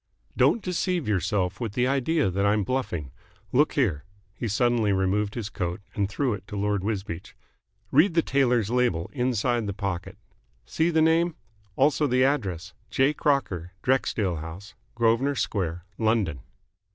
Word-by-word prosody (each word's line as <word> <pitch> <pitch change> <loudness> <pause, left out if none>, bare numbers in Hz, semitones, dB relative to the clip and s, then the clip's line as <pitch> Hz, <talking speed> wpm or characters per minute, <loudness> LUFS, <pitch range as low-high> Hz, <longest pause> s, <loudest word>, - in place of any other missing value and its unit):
"Don't 230 - +3
deceive 180 - -1
yourself 95 -1 0
with 115 -4 -3
the 125 +2 +1
idea 140 - +1
that 100 +2 0
I'm 100 +1 +3
bluffing. 90 - -2 0.4
Look 145 +4 +3
here." 90 - +1 0.3
He 115 - -4
suddenly 115 0 +2
removed 100 +2 0
his 115 -4 -3
coat 90 -3 -3
and 100 -2 -1
threw 125 +3 0
it 100 -2 -8
to 105 - -7
Lord 100 -1 0
Wisbeach. 95 -5 -4 0.6
"Read 160 +5 +4
the 165 - +4
tailor's 125 -5 +2
label 120 -9 +1
inside 120 -3 0
the 100 - -2
pocket. 95 -3 -4 0.5
See 160 - +1
the 160 -2 +3
name. 165 +1 +3 0.4
Also 145 +4 +3
the 130 0 +3
address. 100 - -1 0.2
'J. 135 +3 +2
Crocker. 95 - 0
Drexdale 110 -8 +1
House. 85 +6 -9 0.2
Grosvenor 120 +4 +2
Square. 90 -7 -2
London.'" 110 - +1
110 Hz, 150 wpm, -26 LUFS, 95-135 Hz, 0.6 s, Read